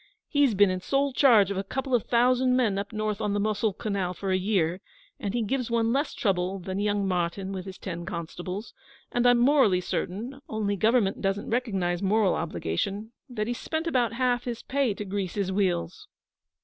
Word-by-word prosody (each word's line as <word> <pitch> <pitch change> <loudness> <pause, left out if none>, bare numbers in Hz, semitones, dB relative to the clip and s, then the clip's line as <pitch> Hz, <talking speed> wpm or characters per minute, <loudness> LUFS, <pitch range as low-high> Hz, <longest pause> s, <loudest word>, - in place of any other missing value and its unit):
'He's 285 -6 +3
been 200 -1 +5
in 185 - -2
sole 275 +6 0
charge 225 -8 +5
of 200 - -2
a 195 - -1
couple 265 +6 -4
of 240 - +2
thousand 250 +1 +3
men 220 -6 +2
up 200 +2 -5
north 215 -1 -2
on 210 -2 0
the 205 - 0
Mosuhl 210 -1 0
Canal 195 -4 -2
for 195 +1 -3
a - - +3
year, 185 -2 0 0.4
and 200 +2 -3
he 235 - +1
gives 250 +2 -1
one 230 0 +1
less 280 +2 -1
trouble 190 -2 0
than 190 +1 -4
young 205 -1 0
Martyn 185 +1 -1
with 190 -1 -5
his 190 - -8
ten 175 -3 -6
constables; 180 +4 -6 0.4
and 245 0 +2
I'm 245 0 +6
morally 240 -7 +4
certain 225 +9 -4
only 210 -2 -1
Government 215 0 +2
doesn't 195 +1 -1
recognise 195 -8 0
moral 200 0 +3
obligations 195 - -3 0.2
that 215 -4 -2
he's 240 +2 -3
spent 320 +1 -3
about 250 -8 +1
half 245 0 0
his 235 -2 -4
pay 265 -6 0
to 210 - -5
grease 195 -2 -3
his 195 -2 -1
wheels. 185 - -1
205 Hz, 195 wpm, -27 LUFS, 190-240 Hz, 0.4 s, I'm